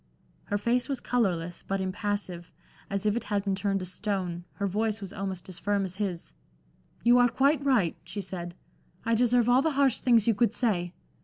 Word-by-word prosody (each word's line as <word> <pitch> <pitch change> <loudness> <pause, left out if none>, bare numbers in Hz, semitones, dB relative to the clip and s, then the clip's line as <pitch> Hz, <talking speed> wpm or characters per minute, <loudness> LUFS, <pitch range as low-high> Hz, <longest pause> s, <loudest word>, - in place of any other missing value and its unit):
Her 205 - -1
face 240 +6 0
was 275 - -1
colorless, 175 -8 -1
but 195 0 -1
impassive, 190 -2 -3 0.4
as 200 +1 -2
if 210 0 +2
it 240 - -3
had 205 -2 0
been 200 -1 0
turned 195 0 0
to - - -3
stone, 185 -2 -3
her 200 - -3
voice 215 +2 0
was 195 -2 -7
almost 190 -2 -5
as 185 -2 -8
firm 200 -1 0
as 185 0 -7
his. 190 -5 -3 0.7
"You 240 +1 +6
are 245 0 +5
quite 280 +4 +2
right," 240 - +2
she 205 - -5
said. 175 -2 -6 0.5
"I 230 - +2
deserve 240 0 +3
all 245 +2 +5
the 320 - +2
harsh 275 -4 +3
things 235 -4 +4
you 230 - +5
could 225 +1 +1
say. 180 -8 0
205 Hz, 200 wpm, -28 LUFS, 185-235 Hz, 0.7 s, You